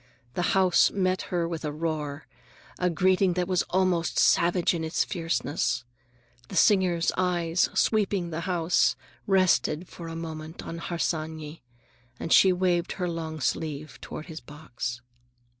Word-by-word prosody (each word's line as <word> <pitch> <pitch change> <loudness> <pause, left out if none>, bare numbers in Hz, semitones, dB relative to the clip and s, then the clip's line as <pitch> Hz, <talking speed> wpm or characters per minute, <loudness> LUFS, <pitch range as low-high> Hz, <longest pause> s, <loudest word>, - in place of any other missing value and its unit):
The 175 +4 +1
house 185 -2 +5
met 185 -1 0
her 170 -2 0
with 165 -2 -5
a 150 - -2
roar, 150 -2 -3 0.5
a 180 - +2
greeting 185 +2 +2
that 180 0 -1
was 185 -2 +2
almost 180 -3 +1
savage 175 +1 +3
in 165 -2 -3
its 160 +1 0
fierceness. 165 - -1 0.6
The - - -8
singer's 180 -3 +3
eyes, 175 -2 +1
sweeping 200 -5 +1
the 160 - -3
house, 175 -1 +2 0.3
rested 185 -3 +2
for 170 -2 -9
a 165 - -6
moment 160 -1 -7
on 165 - -6
Harsanyi, 160 -2 -3 0.6
and 165 - 0
she 190 - +7
waved 180 -1 +1
her 180 - -3
long 160 -2 -4
sleeve 150 -2 -3
toward 155 - -7
his 160 -2 -8
box. 120 -5 -6
170 Hz, 140 wpm, -27 LUFS, 160-180 Hz, 0.6 s, she